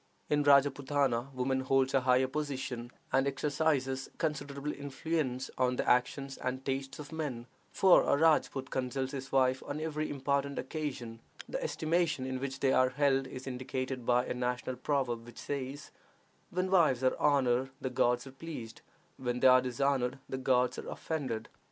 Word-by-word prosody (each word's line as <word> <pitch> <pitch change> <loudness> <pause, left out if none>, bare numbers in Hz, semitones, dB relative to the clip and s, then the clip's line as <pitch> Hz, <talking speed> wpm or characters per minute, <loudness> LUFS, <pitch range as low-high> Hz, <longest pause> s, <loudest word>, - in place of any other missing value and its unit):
In 150 0 +3
Rajpootana 140 -2 +3
woman 130 0 0
holds 130 0 +2
a 135 - +4
higher 125 +1 +4
position, 130 -4 -4 0.2
and 135 +1 +3
exercises 140 -1 0
considerable 145 -2 -2
influence 140 -2 -2
on 125 0 +2
the - - -2
actions 135 +2 +1
and 130 +1 -3
tastes 135 0 -3
of 150 0 -9
men, 145 -7 -4 0.3
for 190 -2 +6
a 140 - +2
Rajpoot 150 -4 +2
consults 130 +1 -2
his 135 -2 -6
wife 130 -1 +3
on 145 - -3
every 155 -1 -2
important 140 0 -1
occasion. 130 -7 -4 0.3
The - - -3
estimation 165 - 0
in 130 0 -3
which 135 0 -5
they 135 -1 +3
are 130 0 +4
held 135 -1 +2
is 130 0 -8
indicated 130 0 -4
by 125 +1 +3
a - - -2
national 125 0 -2
proverb, 125 -5 -1
which 120 0 -13
says, 140 0 -5 0.6
"When 185 +1 -1
wives 155 -9 +4
are 130 - +3
honored 130 -3 +3
the 130 - -3
gods 125 0 +2
are 135 - -9
pleased; 135 -6 -8 0.4
when 125 -1 -2
they 130 - +6
are 130 0 +7
dishonored 130 0 0
the 130 - -4
gods 125 -1 +2
are - - -7
offended." 135 -9 -3
135 Hz, 165 wpm, -32 LUFS, 130-145 Hz, 0.6 s, are